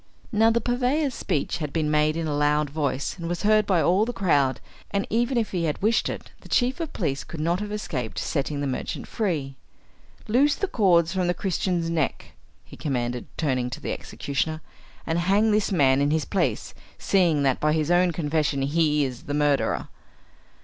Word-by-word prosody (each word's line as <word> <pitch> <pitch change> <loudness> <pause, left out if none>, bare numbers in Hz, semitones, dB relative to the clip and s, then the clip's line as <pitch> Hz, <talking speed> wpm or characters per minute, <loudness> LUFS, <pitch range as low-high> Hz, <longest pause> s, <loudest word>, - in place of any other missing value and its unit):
Now 225 0 +4
the 230 +1 +2
purveyor's 255 +4 0
speech 150 - -2
had 150 -3 -3
been 155 -1 0
made 155 +1 +2
in 165 - -2
a 150 -2 -1
loud 150 0 +1
voice, 140 -3 -2
and 165 0 -4
was 175 0 -3
heard 215 0 +4
by 180 -5 +3
all 185 +4 +3
the 235 - -1
crowd, 145 - +1 0.3
and 200 -1 -1
even 240 +3 +1
if 225 -2 0
he 175 -3 -1
had 150 - -2
wished 220 +3 +2
it, - - -7
the - - -15
chief 255 +6 +1
of 330 -2 -4
police 140 -7 -2
could 165 - -9
not 170 +4 0
have 210 0 -5
escaped 140 - -4
setting 145 -1 -2
the - - -1
merchant 130 -2 -4
free. 155 - -2 0.7
"Loose 275 +6 +3
the 395 - -1
cords 175 - +3
from 185 -2 0
the 175 - +1
Christian's 180 -3 -1
neck," 155 -4 -2 0.3
he - - -13
commanded, 125 -4 -3
turning 130 -5 0
to 125 - -6
the - - -4
executioner, 155 +3 -3 0.4
"and 165 +1 0
hang 200 +5 +3
this 210 -1 +1
man 140 -6 +4
in 145 - +2
his 155 -1 +1
place, 195 - -1 0.2
seeing 170 -7 +2
that 135 -2 +2
by 150 - +2
his 155 +1 0
own 175 0 +4
confession 150 -3 0
he 150 0 +2
is 125 -2 -7
the 145 - -3
murderer." 145 -1 +1
165 Hz, 195 wpm, -25 LUFS, 145-200 Hz, 0.7 s, Now